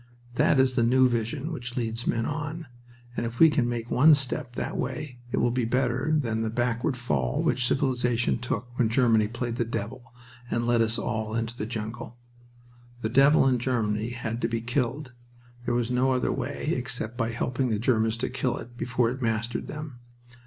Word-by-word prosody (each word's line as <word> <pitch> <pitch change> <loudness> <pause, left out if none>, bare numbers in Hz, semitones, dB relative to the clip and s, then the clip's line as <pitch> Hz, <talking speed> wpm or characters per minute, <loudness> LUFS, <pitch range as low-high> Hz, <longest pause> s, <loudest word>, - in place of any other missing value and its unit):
That 130 +2 +3
is 130 -1 +4
the 120 - +2
new 130 +2 +5
vision 125 +6 -2
which 125 -6 -6
leads 115 0 -2
men 115 -1 +1
on, 155 +2 -4 0.5
and - - -2
if 115 +1 -4
we 160 +1 +7
can 130 -5 +1
make 120 -1 -4
one 150 +4 +7
step 135 -2 -2
that - - -3
way 145 -5 -4
it - - -1
will 120 - +2
be 125 0 0
better 125 +4 0
than 115 -6 -1
that 110 0 -2
backward 120 +1 0
fall 65 - 0
which 125 -1 +1
civilization 125 -4 +1
took 120 -1 -2
when 115 -3 +3
Germany 115 -3 +3
played 120 +1 -4
the - - +2
devil 115 +1 -5 0.4
and 120 0 0
led 120 -1 +3
us 115 +1 +1
all 110 0 -2
into 115 +1 -2
the 105 -3 -4
jungle. 115 +1 -6 0.8
The 110 - -1
devil 135 +3 +5
in 125 -2 +2
Germany 115 -3 0
had 120 -1 -4
to - - +2
be 115 0 -2
killed. 125 +3 -2 0.5
There - - 0
was 120 0 0
no 130 +1 +2
other 125 - +1
way, 145 +4 -2
except 125 -2 -4
by 115 -2 -1
helping 125 +2 -1
the 110 - +1
Germans 110 -1 +1
to 120 - -2
kill 125 -1 -1
it 120 +2 -10
before 120 -1 0
it 130 +1 -6
mastered 115 0 -1
them. 150 -5 -7
120 Hz, 195 wpm, -27 LUFS, 115-130 Hz, 0.8 s, we